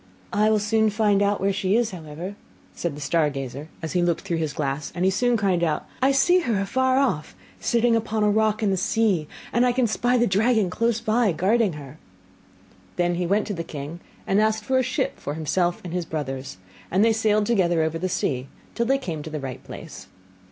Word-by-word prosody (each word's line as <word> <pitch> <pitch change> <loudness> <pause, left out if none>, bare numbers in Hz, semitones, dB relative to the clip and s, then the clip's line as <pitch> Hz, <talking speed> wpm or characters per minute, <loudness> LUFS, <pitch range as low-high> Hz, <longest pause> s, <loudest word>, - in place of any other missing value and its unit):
'I 210 +1 +3
will 220 - +4
soon 220 +1 +2
find 205 -1 +2
out 205 0 +2
where 195 0 +1
she 190 +1 +1
is, 235 -1 +2
however,' 170 +2 -7 0.4
said 165 -4 -4
the - - -8
star 150 +2 +2
gazer, 135 +2 -6
as 160 - -3
he 180 - +2
looked 170 -1 +1
through 175 -4 -2
his 160 -2 -1
glass; 140 0 -3
and 180 +1 0
he 190 - +4
soon 245 +4 +2
cried 190 -5 +1
out, 155 -3 -1
'I 265 +1 +4
see 350 +7 +4
her 235 - 0
afar 260 +6 +1
off, 250 - 0 0.2
sitting 235 0 +2
upon 220 -1 0
a 210 - +4
rock 215 0 +1
in 200 - +2
the 190 - +1
sea, 190 -5 +1 0.3
and 240 - +3
I 250 - +4
can 250 0 +2
spy 245 +3 +1
the 240 - +3
dragon 215 -1 +2
close 230 +2 +1
by, 220 -1 +2
guarding 200 +4 +2
her.' 145 0 -10 1.0
Then 175 0 +1
he 175 0 -1
went 205 +4 +2
to 210 - -3
the 165 -3 -4
king, 150 +2 -7 0.3
and 195 +2 +2
asked 215 0 +1
for 260 +4 +2
a - - +3
ship 255 - -2
for 145 - -4
himself 175 +3 0
and 175 -2 -6
his 180 -1 -2
brothers; 135 -8 -5 0.3
and 195 +4 +3
they 225 - +4
sailed 215 -1 +2
together 175 -7 +2
over 160 +1 -2
the 185 +2 -1
sea, 130 -6 -1 0.3
till 235 -1 -1
they 270 +1 +3
came 170 - -5
to 155 - -7
the 155 -1 -4
right 135 -2 -6
place. - - -10
195 Hz, 220 wpm, -24 LUFS, 160-225 Hz, 1.0 s, will